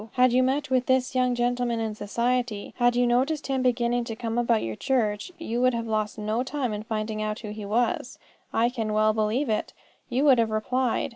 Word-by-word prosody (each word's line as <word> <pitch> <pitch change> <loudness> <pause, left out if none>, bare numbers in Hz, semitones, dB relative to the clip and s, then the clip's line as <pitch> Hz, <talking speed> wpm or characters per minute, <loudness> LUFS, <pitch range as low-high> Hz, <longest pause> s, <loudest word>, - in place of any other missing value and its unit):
Had 250 -1 +4
you 255 - +4
met 270 +2 0
with 255 -1 +2
this 260 0 +2
young 250 -1 +2
gentleman 240 -1 0
in 220 -1 -2
society, 235 +1 -2
had 245 -1 +3
you 245 0 +3
noticed 265 +6 +1
him 265 -1 0
beginning 245 -1 +1
to 225 - -5
come 230 +1 -2
about 235 -2 +2
your 110 -1 -3
church, 215 - -1
you 240 -7 -3
would 255 -1 +3
have 230 0 -2
lost 215 -1 -2
no 215 +2 -1
time 260 -3 -2
in 210 - -4
finding 215 0 -3
out 215 0 -3
who 215 -3 -6
he 210 -1 -7
was. 240 +4 -1 0.3
I 235 +2 +2
can 225 -4 -3
well 215 0 +3
believe 220 +6 0
it, 215 -1 -1 0.4
you 255 +3 +1
would 265 -4 +6
have 225 -1 +2
replied. 235 +3 0
240 Hz, 215 wpm, -26 LUFS, 215-255 Hz, 0.4 s, would